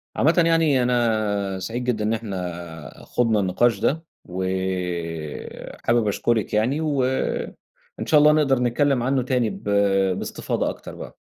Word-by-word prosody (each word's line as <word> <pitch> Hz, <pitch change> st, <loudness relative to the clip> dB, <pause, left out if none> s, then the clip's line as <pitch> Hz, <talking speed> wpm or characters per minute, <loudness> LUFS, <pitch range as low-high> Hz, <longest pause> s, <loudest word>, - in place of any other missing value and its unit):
عامةً 165 Hz, +5 st, +3 dB
يعني 160 Hz, -6 st, +3 dB
أنا 110 Hz, -5 st, 0 dB
سعيد 115 Hz, +6 st, -4 dB
جدًا 120 Hz, -4 st, -1 dB
إن 110 Hz, +1 st, +1 dB
إحنا 90 Hz, -7 st, -6 dB
خُضنا 115 Hz, -3 st, +1 dB
النقاش 100 Hz, +3 st, +2 dB
ده، 155 Hz, +9 st, 0 dB, 0.2 s
وحابِب 90 Hz, +3 st, -3 dB
أشكرِك 110 Hz, +2 st, 0 dB
يعني، 120 Hz, +8 st, +1 dB
و 150 Hz, -3 st, -1 dB, 1.0 s
وإن -, -, -3 dB
شاء 150 Hz, -, +5 dB
الله 150 Hz, +1 st, +7 dB
نقدَر 145 Hz, -4 st, +3 dB
نتكلِّم 125 Hz, +1 st, +1 dB
عنه 130 Hz, +1 st, +1 dB
تاني 125 Hz, -3 st, +1 dB
ب -, -, -9 dB, 0.5 s
باستفاضة -, -, -2 dB
أكتر -, -, -8 dB
بقى. -, -, -9 dB
115 Hz, 135 wpm, -23 LUFS, 95-130 Hz, 1.0 s, الله